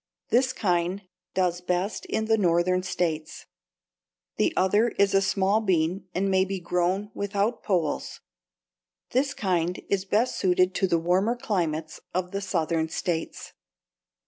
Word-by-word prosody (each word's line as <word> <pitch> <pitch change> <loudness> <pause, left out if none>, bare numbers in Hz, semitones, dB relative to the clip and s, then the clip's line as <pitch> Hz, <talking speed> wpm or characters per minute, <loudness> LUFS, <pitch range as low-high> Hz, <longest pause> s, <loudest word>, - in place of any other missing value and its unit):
This 255 +3 +3
kind 180 -3 0 0.3
does 180 -2 +1
best 180 +3 -2
in 220 - -1
the 220 0 +3
Northern 180 -2 +2
states. 170 -4 -3 0.9
The - - +2
other 205 +5 +3
is 200 0 +3
a 195 - +5
small 195 +1 +2
bean 185 -1 0
and 190 +2 +1
may 190 0 +4
be 195 0 -3
grown 180 +4 -1
without 200 +3 -1
poles. 170 -7 -1 0.9
This 275 +3 +1
kind 180 -2 0
is 195 -1 0
best 220 +6 +1
suited 185 0 +3
to 190 - +1
the 170 - +2
warmer 185 +8 +1
climates 165 -9 -2 0.2
of 180 0 -1
the 200 - -3
Southern 165 -4 -1
states. 165 0 -3
185 Hz, 140 wpm, -26 LUFS, 175-200 Hz, 0.9 s, a